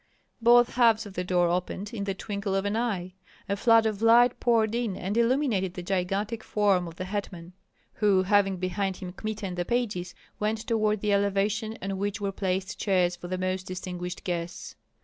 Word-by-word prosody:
Both 240 Hz, +1 st, +5 dB
halves 230 Hz, -2 st, +4 dB
of 200 Hz, -, -9 dB
the 180 Hz, -, -2 dB
door 180 Hz, -1 st, +2 dB
opened 185 Hz, +4 st, -3 dB
in 200 Hz, -3 st, -3 dB
the 195 Hz, -1 st, -2 dB
twinkle 200 Hz, -1 st, -3 dB
of 195 Hz, +1 st, 0 dB
an 205 Hz, +1 st, 0 dB
eye; 200 Hz, -6 st, -2 dB, 0.3 s
a 200 Hz, -, 0 dB
flood 225 Hz, +2 st, +4 dB
of 215 Hz, -1 st, -1 dB
light 235 Hz, +2 st, +5 dB
poured 225 Hz, -2 st, +2 dB
in 235 Hz, -5 st, -1 dB
and 195 Hz, +3 st, -3 dB
illuminated 235 Hz, -6 st, +1 dB
the 180 Hz, -, -5 dB
gigantic 195 Hz, +4 st, -2 dB
form 200 Hz, -4 st, +1 dB
of 165 Hz, -, -9 dB
the 185 Hz, -, -5 dB
hetman, 185 Hz, -3 st, -5 dB, 0.4 s
who 200 Hz, -3 st, +3 dB
having 195 Hz, -1 st, +3 dB
behind 185 Hz, +1 st, -2 dB
him 180 Hz, -2 st, -7 dB
Kmita 215 Hz, +1 st, -5 dB
and 180 Hz, -2 st, -5 dB
the 175 Hz, -, 0 dB
pages, 190 Hz, -6 st, -2 dB, 0.2 s
went 215 Hz, +1 st, 0 dB
toward 215 Hz, -2 st, +1 dB
the 210 Hz, -1 st, +1 dB
elevation 200 Hz, +3 st, 0 dB
on 195 Hz, -1 st, -3 dB
which 205 Hz, +2 st, -2 dB
were 200 Hz, -1 st, -2 dB
placed 190 Hz, -1 st, -2 dB
chairs 180 Hz, -3 st, +2 dB
for 175 Hz, 0 st, -9 dB
the 185 Hz, +1 st, -3 dB
most 185 Hz, 0 st, -2 dB
distinguished 180 Hz, -1 st, -5 dB
guests. 175 Hz, -1 st, -4 dB
200 Hz, 190 wpm, -27 LUFS, 185-220 Hz, 0.4 s, Both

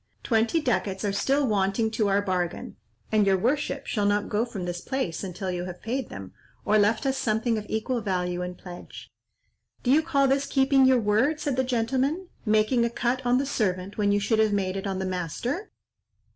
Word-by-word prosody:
Twenty 230 Hz, +6 st, +2 dB
ducats 210 Hz, -7 st, -1 dB
are 200 Hz, -, 0 dB
still 275 Hz, +7 st, +1 dB
wanting 210 Hz, 0 st, +1 dB
to 215 Hz, -2 st, +1 dB
our 200 Hz, +1 st, +2 dB
bargain, 180 Hz, -3 st, -2 dB, 0.4 s
and 215 Hz, -2 st, +3 dB
your 190 Hz, -1 st, +4 dB
worship 275 Hz, +5 st, -1 dB
shall 205 Hz, -3 st, 0 dB
not 205 Hz, 0 st, +1 dB
go 215 Hz, +3 st, +1 dB
from 210 Hz, -7 st, -6 dB
this 175 Hz, 0 st, -4 dB
place 260 Hz, -12 st, -3 dB
until 185 Hz, 0 st, -4 dB
you 180 Hz, 0 st, -3 dB
have 180 Hz, -1 st, -8 dB
paid 250 Hz, +3 st, -2 dB
them, 95 Hz, -1 st, -9 dB, 0.3 s
or 215 Hz, +1 st, +4 dB
left 215 Hz, +5 st, +2 dB
us 270 Hz, 0 st, 0 dB
something 225 Hz, +1 st, 0 dB
of 210 Hz, -1 st, -4 dB
equal 230 Hz, +3 st, -1 dB
value 180 Hz, -3 st, -1 dB
in 180 Hz, 0 st, -4 dB
pledge." 175 Hz, -1 st, -11 dB, 0.7 s
"Do 250 Hz, -, +2 dB
you 300 Hz, +3 st, +5 dB
call 280 Hz, -4 st, +2 dB
this 275 Hz, +1 st, +1 dB
keeping 270 Hz, -1 st, +4 dB
your 260 Hz, -1 st, +5 dB
word," 230 Hz, +9 st, +2 dB
said 285 Hz, -4 st, -1 dB
the 260 Hz, -, +1 dB
gentleman, 265 Hz, +8 st, -1 dB, 0.2 s
"making 215 Hz, +3 st, +3 dB
a 235 Hz, -, +1 dB
cut 245 Hz, +2 st, -1 dB
on 245 Hz, +1 st, +4 dB
the 275 Hz, -, 0 dB
servant 200 Hz, -6 st, -2 dB
when 205 Hz, -1 st, +3 dB
you 205 Hz, -, +3 dB
should 220 Hz, +2 st, +1 dB
have 215 Hz, -1 st, +3 dB
made 190 Hz, -2 st, 0 dB
it 195 Hz, +1 st, -3 dB
on 190 Hz, -1 st, -2 dB
the 190 Hz, -, -2 dB
master?" 185 Hz, -, -3 dB
220 Hz, 205 wpm, -26 LUFS, 195-260 Hz, 0.7 s, you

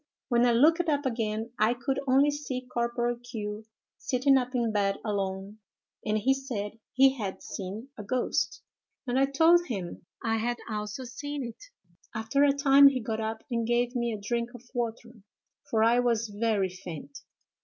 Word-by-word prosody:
When 240 Hz, 0 st, +4 dB
I -, -, +4 dB
looked 320 Hz, +8 st, +4 dB
up 290 Hz, -1 st, +1 dB
again 225 Hz, -2 st, -2 dB
I 220 Hz, +3 st, +3 dB
could 265 Hz, +3 st, -2 dB
only 275 Hz, +3 st, +5 dB
see 270 Hz, -3 st, -4 dB
Corporal 240 Hz, 0 st, 0 dB
Q——, 220 Hz, -3 st, -6 dB, 0.3 s
sitting 270 Hz, +2 st, +3 dB
up 255 Hz, -1 st, 0 dB
in 235 Hz, -2 st, +1 dB
bed 200 Hz, -2 st, +1 dB
alone, 195 Hz, 0 st, -3 dB, 0.4 s
and 215 Hz, 0 st, 0 dB
he 260 Hz, +6 st, +3 dB
said 225 Hz, -6 st, -5 dB
he 265 Hz, 0 st, +6 dB
had 195 Hz, -3 st, -4 dB
seen 205 Hz, +7 st, -6 dB
a -, -, -5 dB
ghost; 250 Hz, +4 st, -1 dB, 0.4 s
and 250 Hz, +1 st, +1 dB
I 275 Hz, -, +4 dB
told 330 Hz, +5 st, +4 dB
him 185 Hz, -6 st, -5 dB, 0.2 s
I 225 Hz, 0 st, +1 dB
had 240 Hz, +2 st, -1 dB
also 210 Hz, +2 st, -4 dB
seen 285 Hz, +3 st, -5 dB
it. 235 Hz, -2 st, -9 dB, 0.5 s
After 220 Hz, +6 st, +1 dB
a 285 Hz, -, +6 dB
time 280 Hz, 0 st, +7 dB
he 270 Hz, -2 st, +3 dB
got 220 Hz, -1 st, -3 dB
up 220 Hz, 0 st, -3 dB
and 230 Hz, -1 st, 0 dB
gave 240 Hz, +1 st, +1 dB
me 235 Hz, -1 st, 0 dB
a 215 Hz, -, -4 dB
drink 235 Hz, +3 st, -2 dB
of 245 Hz, -, -11 dB
water, 235 Hz, -2 st, -4 dB, 0.5 s
for 220 Hz, 0 st, +2 dB
I 235 Hz, +2 st, +4 dB
was 230 Hz, -2 st, +1 dB
very 205 Hz, -2 st, 0 dB
faint. 185 Hz, -, -9 dB
235 Hz, 175 wpm, -28 LUFS, 215-265 Hz, 0.5 s, time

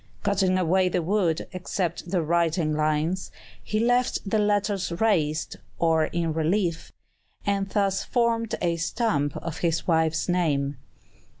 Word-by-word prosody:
Cutting 195 Hz, -2 st, +2 dB
away 185 Hz, +1 st, +2 dB
the 175 Hz, -1 st, 0 dB
wood, 175 Hz, -3 st, +1 dB
except 180 Hz, -2 st, -3 dB
the 180 Hz, -2 st, +1 dB
writing 165 Hz, -1 st, +1 dB
lines, 155 Hz, +4 st, 0 dB, 0.3 s
he 215 Hz, -, -1 dB
left 245 Hz, -1 st, +1 dB
the 215 Hz, +2 st, +1 dB
letters 205 Hz, -3 st, +1 dB
raised, 160 Hz, -8 st, +1 dB, 0.2 s
or 160 Hz, -2 st, +3 dB
in 170 Hz, -1 st, -2 dB
relief, 165 Hz, +2 st, 0 dB, 0.5 s
and 195 Hz, -1 st, 0 dB
thus 195 Hz, -1 st, +1 dB
formed 230 Hz, -2 st, 0 dB
a 170 Hz, -1 st, +1 dB
stamp 160 Hz, -, 0 dB
of 165 Hz, 0 st, -5 dB
his 165 Hz, -1 st, 0 dB
wife's 160 Hz, -2 st, +1 dB
name. 145 Hz, -6 st, 0 dB
175 Hz, 130 wpm, -25 LUFS, 160-200 Hz, 0.5 s, or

